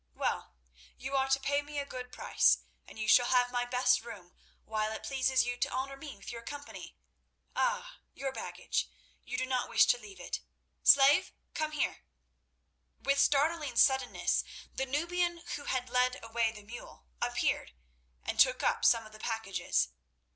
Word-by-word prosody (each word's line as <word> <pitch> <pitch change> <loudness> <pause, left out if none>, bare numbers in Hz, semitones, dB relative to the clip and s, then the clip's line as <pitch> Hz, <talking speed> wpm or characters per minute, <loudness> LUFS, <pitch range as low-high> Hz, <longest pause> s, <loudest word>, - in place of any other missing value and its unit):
Well, - - -2 0.4
you 265 +2 -4
are 270 0 +2
to 270 0 +3
pay 285 +1 +1
me 290 0 -8
a 285 - -1
good 250 -2 -7
price, - - +3 0.2
and - - -13
you 215 0 -3
shall 245 +2 +6
have 245 -1 +3
my 245 0 0
best 250 0 +3
room 205 -7 -11 0.3
while 215 0 -1
it - - -7
pleases 260 -2 +2
you 245 0 -3
to - - 0
honour 270 +1 -3
me 280 -2 -9
with 195 - -9
your 235 -1 -7
company. 285 +4 -9 0.6
Ah! - - -1 0.2
your 270 -1 -3
baggage. - - -3 0.3
You 250 - -4
do 255 - 0
not 255 -1 -1
wish - - +6
to - - +3
leave 400 -4 -12
it. - - -4 0.4
Slave, 280 +6 +6 0.2
come 310 0 -2
here." 300 - -1 1.0
With 275 0 +1
startling 295 +2 +2
suddenness 265 -1 +3 0.3
the 265 - -2
Nubian 345 +4 -1
who 285 - -8
had 255 -1 -1
led 250 +1 +2
away 225 0 0
the 210 -2 -12
mule 210 - -11 0.2
appeared, - - -1 0.5
and - - -4
took - - +5
up - - +1
some 230 -1 +4
of 215 - -13
the 215 - -13
packages. 225 - -1
260 Hz, 170 wpm, -31 LUFS, 240-285 Hz, 1.0 s, shall